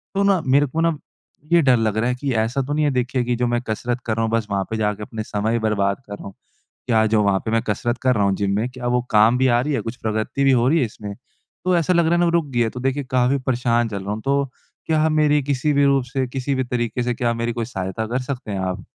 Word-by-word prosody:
तो 200 - +2
ना, 195 -4 +3
मेरे 140 +2 +4
को 160 +6 -2
ना 165 -2 +1 0.6
ये 170 - +6
डर 130 -5 +4
लग 110 -1 0
रहा 120 +3 +1
है 125 - 0
कि 135 +1 -3
ऐसा 125 +5 -1
तो 140 +2 -3
नहीं 150 0 +1
है 145 - +2
देखिए, 125 0 0
कि 120 0 0
जो 125 +1 0
मैं 120 0 0
कसरत 120 +3 -2
कर 110 - -1
रहा 115 - 0
हूँ, 110 - -3
बस 115 -2 0
वहाँ 100 -1 0
पे 110 - -2
जाके 105 -1 -1
अपना 110 +1 -6
समय 110 +3 -1
बर्बाद 100 -1 0
कर 100 - -7
रहा - - -11
हूँ। 100 - -8 0.5
क्या 110 -3 +3
जो 110 -1 +2
वहाँ 100 -1 +2
पे 110 - -2
मैं 115 0 +1
कसरत 120 +4 -2
कर 130 -1 +3
रहा 105 -3 +1
हूँ 100 -1 +2
जिम 100 0 -1
में, 115 +4 0
क्या 125 -1 -7
वो 125 0 +1
काम 110 +4 +5
भी 130 - +3
आ 120 -1 +3
रही 150 +4 -1
है, - - 0
कुछ 115 +2 -6
प्रगति 110 +5 -1
भी 135 - +5
हो 120 0 +3
रही 165 +4 +3
है 130 - +2
इसमें? 105 -2 -7 0.5
तो 185 -1 +3
ऐसा 170 +1 +2
लग 170 -1 +3
रहा 160 - +1
है - - +2
ना, 175 - +3
वो 170 - +2
रुक 170 -2 +2
गई 125 -4 -2
है। 115 - +3
तो 125 - -7
देखिए, 135 +2 -1
काफ़ी 130 +2 +2
परेशान 120 -2 +1
चल 100 -2 -5
रहा 100 - -3
हूँ। 110 - -4
तो 140 +1 +1 0.4
क्या 160 0 +2
मेरी 150 -2 +3
किसी 140 +1 0
भी 140 0 +3
रूप 135 -2 +3
से, 130 +1 -2
किसी 135 +2 -2
भी 130 - 0
तरीके 120 0 -2
से, 120 0 -1
क्या 120 -1 0
मेरी 115 0 -2
कोई 115 0 -3
सहायता 95 -1 -4
कर 125 +3 -2
सकते 125 -4 -5
हैं 100 - -2
आप? 95 0 -3
120 Hz, 295 wpm, -21 LUFS, 110-135 Hz, 0.6 s, ये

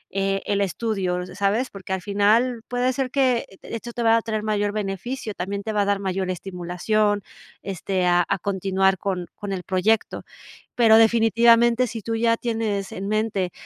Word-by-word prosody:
eh, 195 0 0
el 200 0 0
estudio, 190 -2 -1
¿sabes? 205 +6 0
Porque 190 -1 -9
al 190 - -2
final 215 +4 +2
puede 245 +1 0
ser 260 0 -2
que 255 -4 +1 0.2
esto 235 +1 -7
te 240 - -3
va 225 0 +5
a - - 0
traer 215 -2 -3
mayor 205 -1 0
beneficio, 210 +3 -4
también 200 +3 -4
te 220 +1 -3
va 210 - +2
a - - +1
dar 200 0 +1
mayor 190 -1 -2
estimulación, 195 +4 -1 0.4
este, 190 -1 -2
a 175 0 +4
a 200 - +1
continuar 190 0 +1
con 185 -2 -2
con 205 -2 -6
el 185 -2 -4
proyecto. 200 +5 0 0.5
Pero 225 -2 +6
definitivamente 235 +2 +4
sí 225 0 -6
tú 225 +2 -2
ya 230 0 +2
tienes 220 -5 -2
en 195 - -5
mente 215 -4 -1
205 Hz, 175 wpm, -23 LUFS, 195-230 Hz, 0.5 s, Pero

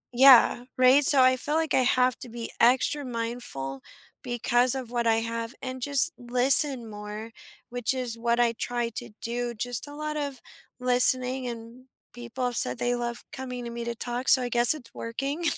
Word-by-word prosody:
Yeah, 250 -1 +6
right? 255 +3 +5
So, 270 -1 +6
I 255 0 +4
feel 295 +4 -2
like 320 -2 0
I 260 - +4
have 250 0 +1
to 245 - -9
be 230 0 -7
extra 260 +4 +2
mindful, 230 - -5 0.4
because 245 +1 0
of 255 -3 -6
what 240 -1 -1
I 225 - +4
have, 230 +1 -4
and 260 -1 -6
just 285 +5 +2
listen 250 +1 +3
more, 210 +2 -8 0.4
which 245 +1 -2
is 250 -3 -3
what 235 +1 0
I 235 -1 +2
try 240 0 -3
to 235 +1 -8
do. 240 +1 -3
Just 245 +4 -4
a 290 - -10
lot 305 0 -4
of 280 -3 -4 0.4
listening, 250 +1 +3
and 235 +2 -9 0.3
people 240 +1 -6
have 245 -1 -2
said 125 - +1
they 245 0 -1
love 240 0 -5
coming 250 -2 -6
to 235 - -6
me 235 0 -6
to 235 - -4
talk, 245 +2 -3
so 265 - +7
I 245 - -3
guess 240 +3 +4
it's 245 -6 -14
working. 275 +8 -5
245 Hz, 190 wpm, -26 LUFS, 235-260 Hz, 0.4 s, so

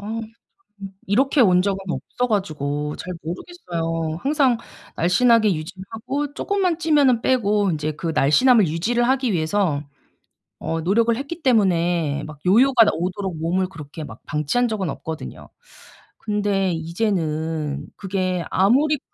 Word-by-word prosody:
어으 220 +3 -4 0.4
참. 210 - -12 0.2
이렇게 265 +8 +2
온 180 -6 +5
적은 195 -1 -1
없어 250 +7 -3
가지고 150 -7 -2
잘 180 - -6
모르겠어요. 165 - -4
항상 275 -4 +2 0.4
날씬하게 220 +4 +4
유지를 180 +5 -7
하고 275 +6 -4
쪼끔만 375 -5 0
찌면은 290 -8 +3
빼고 210 -6 +2
인제 155 0 -2
그 165 +2 -4
날씬함을 210 - +4
유지를 220 +10 0
하기 260 -3 +1
위해서 160 -2 0 0.8
어 165 +1 -3
노력을 225 +7 +2
했기 280 +6 -6
때문에 175 - +2
막 155 -1 -10
요요가 235 +5 +6
오도록 185 +1 -3
몸을 180 +3 0
그렇게 155 -3 -9
막 - - -11
방치한 150 - 0
적은 205 -6 -2
없거든요. 160 -1 -7 0.7
근데 205 -3 0
이제는 160 -4 -2
그게 185 -2 -2
아무리 275 +10 +3
195 Hz, 300 characters per minute, -22 LUFS, 165-240 Hz, 0.8 s, 요요가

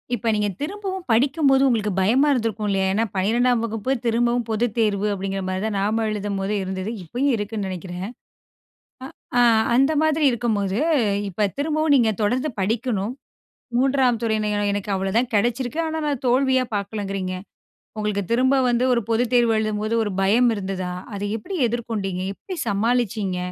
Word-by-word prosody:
இப்ப 230 +1 -5
நீங்க 210 0 +1
திரும்பவும் 380 +2 -4
படிக்கும்போது 275 +3 +3
உங்களுக்கு 215 -4 +1
பயமா 250 +10 +3
இருந்திருக்கும் 225 -4 -1
இல்லயா! 195 -1 +1
ஏன்னா, 220 +3 +1
12ம் 235 +5 +2
வகுப்பு 225 +2 -2
திரும்பவும் 235 0 +1
பொதுத் 225 0 0
தேர்வு 210 -2 +1
அப்பிடிங்கிறமாரிதான் 195 +1 -2
நாம 215 +3 0
எழுதும்போது 200 -1 -2
இருந்தது. 190 +2 -4
இப்பயும் 255 - 0
இருக்குன்னு 205 -1 -3
நினைக்கிறேன். 180 0 -5 1.3
அ - - +6 0.3
அந்த 270 +4 +4
மாதிரி 315 -1 +2
இருக்கும்போது, 215 -4 -1 0.5
இப்ப 200 +3 0
திரும்பவும் 310 +1 +1
நீங்க 230 -4 +4
தொடர்ந்து 255 +8 +1
படிக்கணும், 220 +1 -1 0.6
3ம் 260 -3 +2
துறையின 215 -2 0 0.2
எனக்கு 205 0 -3
அவ்ளதான் 195 +6 0
கிடைச்சிருக்கு. 240 +6 0
ஆனா, 320 0 -3
நான் 280 -3 -2
தோல்வியா 260 0 +3
பார்க்கலங்குறீங்க. 195 -2 -3 0.6
உங்களுக்கு 210 -2 -1
திரும்ப 260 +3 +3
வந்து 240 +1 +1
ஒரு 235 - 0
பொதுத் 240 +2 +1
தேர்வு 235 -2 +4
எழுதும்போது 215 +1 -1
ஒரு 205 - -3
பயம் 235 +5 +4
இருந்ததா? 190 -2 -4 0.2
அதை 205 +1 -3
எப்பிடி 370 - -6
எதிர்கொண்டீங்க? 210 -6 -3
எப்பிடி 370 - -8
சமாளிச்சீங்க? 215 -3 0
225 Hz, 140 wpm, -22 LUFS, 200-250 Hz, 1.3 s, அ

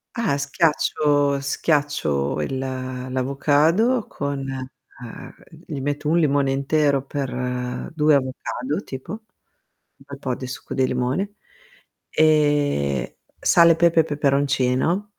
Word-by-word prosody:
Ah, 230 - 0
schiaccio 145 -1 +1
schiaccio 140 - 0
il 130 - -3
l'avocado 135 - 0
con 140 -1 -4
ah, 130 -2 -9 0.3
gli 150 -5 -4
metto 145 +2 -2
1 165 - +3
limone 140 -4 +2
intero 140 0 +1
per 125 0 -4
2 150 -1 +4
avocado 130 +1 -2
tipo, 130 -1 -8
un 215 - -4 0.8
bel 140 0 -11
po' 130 -2 -2
di 130 - -7
succo 125 - -7
di 130 -1 +1
limone, 130 +12 -1 0.7
e 145 - +2 0.2
sale, 170 -1 +5
pepe 170 0 +3
e - - -1
peperoncino. 140 +5 +1
140 Hz, 110 wpm, -22 LUFS, 130-150 Hz, 0.8 s, sale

